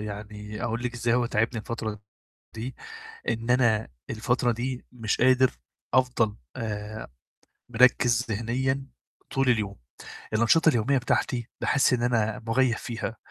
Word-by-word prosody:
يعني 105 0 -7
أقول 120 +1 -2
لِك 125 0 -3
إزاي 120 0 +1
هو 125 -1 +2
تاعبني 115 +1 0
الفترة 110 -2 -4 0.6
دي 120 +3 -5 0.5
إن 115 +1 -1
أنا 120 -4 +3 0.2
الفترة 120 +2 +1
دي 125 +2 -4
مش 115 -4 -1
قادر 130 +1 +5 0.4
أفضل 125 -5 +2 0.2
آآ 105 -1 -5 0.6
مركّز 120 0 +4
ذِهنيًا 130 +5 -1 0.4
طول 135 -1 +1
اليوم. 105 -4 0 0.6
الأنشطة 120 +9 +5
اليوميّة 135 0 +2
بتاعتي 120 -1 0
باحس 135 -2 +3
إن 120 - +1
أنا 110 -2 +1
مُغيّب 120 0 +2
فيها، 115 -1 -5
120 Hz, 125 wpm, -27 LUFS, 110-125 Hz, 0.6 s, قادر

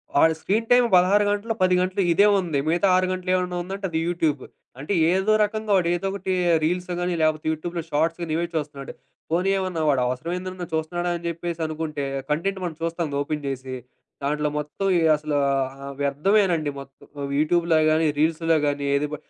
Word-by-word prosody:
వాడు 160 +3 +5
screen 220 +7 -1
time 245 0 +6
16 190 +3 +5
గంటల్లో, 205 +2 -1
10 185 0 +4
గంటలు 185 +2 0
ఇదే 200 +4 +5
ఉంది. 165 -6 -2
మిగతా 175 +5 +2
6 185 0 +2
గంటలు 185 0 -2
ఏమన్నా 180 -1 -1
ఉందంటే, 195 +2 -5
అది 160 -1 -1
యూట్యూబ్. 160 -5 0 0.4
అంటే 150 +9 -3 0.2
ఏదో 190 +3 +2
రకంగా 215 0 -2
వాడేదోకటి 185 +2 -1 0.3
రీల్స్ 180 +3 -1
గాని, 180 0 -1
లేపోతే 155 -1 +1
యూట్యూబ్‍లో 170 +2 -4
షార్ట్స్ 160 +3 0
గాని 160 -2 -3
ఇవే 170 - 0
చూస్తున్నాడు. 145 -2 -4 0.4
పోనీ 180 +3 +1
ఏమన్నా 185 -4 -2
వాడు 135 -3 +2
అవసరమైంది 170 +9 -3
ఎమన్నా 180 -2 -7
చూస్తున్నాడా 175 +2 -1
అని 170 - -13
చెప్పేసి 170 0 -5
అనుకుంటే, 155 -2 -4 0.3
కంటెంట్ 190 +5 -1
మనం 170 -3 -3
చూస్తాం 165 0 -2
అది 140 - -3
ఓపెన్ 150 0 -3
చేసి. 130 -1 -4 0.5
దాంట్లో 150 +1 0
మొత్తం 150 +7 -3 0.3
అసలు 150 0 -3 0.2
ఆహ్, 135 +1 -3
వ్యర్థమేనండి 160 +2 +2
మొత్తం 135 0 -16 0.3
యూట్యూబ్‍లో 165 +1 +2
గాని, 160 +1 +2
రీల్సుల్లో 165 +1 +2
గాని 145 0 -1
ఏది 145 +1 0
బ - - 0
170 Hz, 170 wpm, -24 LUFS, 150-185 Hz, 0.5 s, time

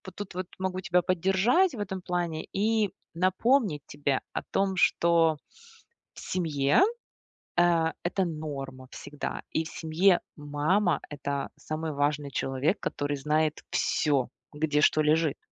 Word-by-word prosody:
тут 205 -3 -7
вот 185 0 -3
могу 185 0 -2
тебя 180 0 +2
поддержать 195 - +2
в 225 - -7
этом 190 -2 -4
плане 175 -3 -2
и 215 0 +1 0.2
напомнить 185 - +2
тебе 140 -2 -1
о - - -2
том, 195 -1 0
что 165 -2 +3 0.8
в - - -12
семье, 145 -6 +1 0.8
э, 170 -2 +4
это 185 +2 0
норма 140 -5 -6
всегда. 145 0 -6
И 160 - 0
в - - -5
семье 175 +3 +2 0.2
мама- 155 +6 +1
это 140 -1 -3
самый 155 +1 -4
важный 145 0 0
человек, 135 +3 0
который 145 0 -2
знает 155 +2 0
всё: 140 -5 +1 0.2
где 150 0 +1
что 155 - +4
лежит. 155 0 +2
160 Hz, 130 wpm, -28 LUFS, 145-185 Hz, 0.8 s, э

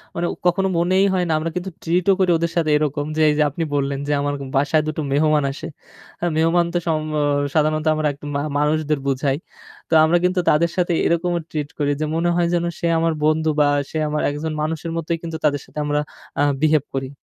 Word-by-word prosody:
মানে 170 - -1 0.2
কখনো 190 +2 +2
মনেই 185 +3 +3
হয় 180 -1 +1
না 160 - +1
আমরা 165 +1 -2
কিন্তু 180 +2 -3
ট্রিট 175 +2 +1
ও - - +6
করি 185 -2 +3
ওদের 170 0 -1
সাথে 160 -2 +1
এরকম 145 -1 -1
যে - - +2
এইযে 150 0 +2
আপনি 165 +4 -3
বললেন 140 -1 -1
যে - - -1
আমার 145 0 -1 0.2
বাসায় 145 +3 +2
দুটো 155 0 -2
মেহমান 150 0 +3
আসে। 145 - -7 0.5
আ - - 0
মেহমান 165 +2 +3
তো - - +2
সম 155 -1 +1 0.2
অ - - +2 0.3
সাধারণত 155 0 +1
আমরা 155 -1 0 0.3
মা 140 - 0 0.2
মানুষদের 150 0 +1
বুঝাই। 135 +1 0 0.5
তো - - -2
আমরা 165 +2 +4
কিন্তু 180 0 +2
তাদের 170 +2 +3
সাথে 175 -1 +1
এরকমও 170 +1 +1
ট্রিট 150 -2 -3
করি 145 0 +1
যে - - +1
মনে 170 +1 +1
হয় 175 -1 +2
যেন 175 -1 +1 0.2
সে 170 - 0
আমার 165 0 +1
বন্ধু 155 +1 +2
বা 145 - +5 0.2
সে - - -4
আমার 150 0 -1
একজন 150 +2 -3
মানুষের 160 +2 -3
মতোই 165 +1 -2
কিন্তু 165 -1 -4
তাদের 145 -2 +1
সাথে - - -17
আমরা 145 0 0 0.4
আ - - +3 0.2
বিহেভ 155 -2 +3
করি। 135 -1 -2
155 Hz, 215 wpm, -21 LUFS, 150-170 Hz, 0.5 s, ও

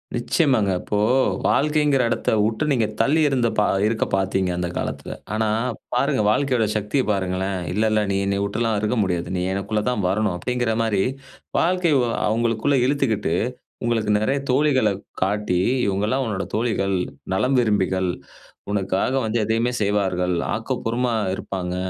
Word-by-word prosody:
நிச்சயமாங்க. 120 - +2
இப்போ 105 - -2 0.5
வாழ்க்கைங்கிற 150 -2 +2
இடத்தவுட்டு 110 +1 0
நீங்க 120 -5 +2
தள்ளி 145 +8 +3
இருந்த 125 -4 +1
பா 105 - +4 0.2
இருக்க 110 0 0
பாத்தீங்க 95 -1 0
அந்த 90 0 -1
காலத்துல. - - -4 0.2
ஆனா, 110 0 +1 0.5
பாருங்க - - +1
வாழ்க்கையோட 125 -1 +1
சக்திய 105 +6 0
பாருங்களேன். 95 -1 -1
இல்ல, 105 +4 0
இல்ல 110 0 +2
நீ 95 - +1
என்னைய 100 0 0
உட்டுலாம் 110 +2 -1
இருக்க 105 +3 0
முடியாது. 90 -3 -2
நீ - - -1
எனக்குள்ள 105 +2 -1
தான் 125 -5 -1
வரணும் 105 -1 0
அப்டிங்கிற 120 +4 -1
மாரி. 110 -4 +1 0.6
வாழ்க்கை 180 0 +2 0.4
அவங்களுக்குள்ள 115 +5 +1
இழுத்துக்கிட்டு 125 - 0 0.5
உங்களுக்கு 115 -3 0
நெறைய 135 +7 0
தோழிகள்ல 130 -5 +3 0.3
காட்டி. 100 -2 0 0.3
இவங்க 100 0 0
எல்லாம் 130 +4 0
உன்னுடைய 105 -4 -3
தோழிகள், 105 -4 0 0.4
நலம் 130 +7 +2
விரும்பிகள், 95 -5 +1 0.6
உனக்காக 100 +4 0
வந்து 110 +1 -1
எதையுமே 115 +3 +1
செய்வார்கள். 95 -3 +1 0.2
ஆக்கப்பூர்வமா 120 +1 -1 0.2
இருப்பாங்க. 90 -2 -4
110 Hz, 135 wpm, -22 LUFS, 100-125 Hz, 0.6 s, பா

